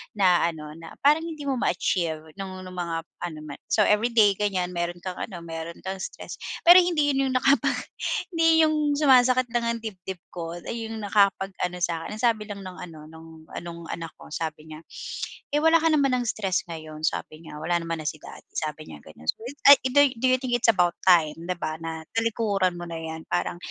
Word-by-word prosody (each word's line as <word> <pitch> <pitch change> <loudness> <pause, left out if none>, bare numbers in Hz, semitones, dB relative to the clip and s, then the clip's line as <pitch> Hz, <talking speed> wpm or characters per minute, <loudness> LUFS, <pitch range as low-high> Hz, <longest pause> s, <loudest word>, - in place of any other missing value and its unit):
na 180 -4 +4
ano 155 -2 -6
na 165 - -11
parang 310 +3 +4
hindi 310 -3 -7
mo 270 -3 -1
ma-achieve 160 -4 0 0.2
nung 185 -1 -6
nung 185 - -9
mga 170 -2 -3 0.2
ano 170 -3 -5
ma 145 -2 -7
So 210 - +3
everyday 215 0 +4
ganyan 185 -3 0
meron 175 0 -3
kang 185 -1 -5
ano 175 -6 -6
meron 165 +1 -7
kang 190 0 -4
stress, - - -7 0.2
pero 350 +2 +10
hindi 320 -5 +2
yun 270 0 +1
yung 255 - -2
nakapag 275 +3 +3 0.6
hindi 325 -1 +4
yung 305 -2 +2
sumasakit 255 -4 +4
lang 235 -1 0
ang - - -6
dibdib 190 -3 -7
ko 170 -1 -5
ay 225 +6 -5
yung 220 -1 -6
nakapag-ano 195 -3 +1
sa 165 -2 0
akin. 210 - -6
Ang 220 - -8
sabi 220 -3 +2
lang 200 -1 -7
ng 185 -1 -9
ano 165 -3 -9
nong 160 0 -13 0.2
ah, - - -5
nong 170 -1 -8
anak 165 -1 -6
ko - - -15
sabi 155 -1 -5
niya, 155 - -8 0.7
"Eh, 295 - +2
wala 325 +1 +5
ka 325 - +4
naman 275 -4 +3
ng 245 - 0
stress 195 -4 0
ngayon." 155 -1 -8
Sabi 155 +1 -3
niya. 150 -2 -9
"Wala 175 +2 0
naman 165 -1 -4
na 150 - -5
si - - -1
daddy." - - -12
Sabi 155 0 -4
niya 75 -2 -11
ganon. 80 0 -15
So, - - 0 0.3
ay 280 0 +11
do 285 - -1 0.2
do 260 - +3
you 255 - +4
think 255 -1 -4
it's 240 -1 +3
about 180 -5 +3
time 165 -5 +5
'di 180 +1 -3
ba 155 -2 -3
na 160 -1 -5
talikuran 210 -5 0
mo 175 - -6
na 165 -1 -6
yan 160 0 -7
parang, 90 - -2
185 Hz, 215 wpm, -25 LUFS, 165-240 Hz, 0.7 s, ay